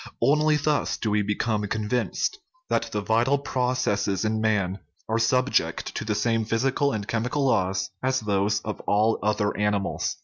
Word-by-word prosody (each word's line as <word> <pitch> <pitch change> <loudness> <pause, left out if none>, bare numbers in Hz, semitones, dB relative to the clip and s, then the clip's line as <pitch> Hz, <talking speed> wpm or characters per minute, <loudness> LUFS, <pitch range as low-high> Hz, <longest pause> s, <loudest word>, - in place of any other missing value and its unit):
Only 150 +2 +3
thus 150 0 0
do 110 - -2
we 105 0 +2
become 105 +1 -1
convinced 110 - -1 0.3
that - - 0
the 105 - -1
vital 115 +7 +2
processes 125 -7 0
in 110 0 0
man 100 -3 0 0.3
are 115 +1 0
subject 115 -7 +1
to - - -3
the 110 -1 -1
same 115 +1 +1
physical 135 +6 +1
and 105 -4 -4
chemical 125 +5 -1
laws 95 -6 +1
as 130 0 +1
those 105 0 +1
of 105 -1 -5
all 105 +2 +2
other 105 0 0
animals. 105 -1 -1
110 Hz, 160 wpm, -25 LUFS, 105-125 Hz, 0.3 s, Only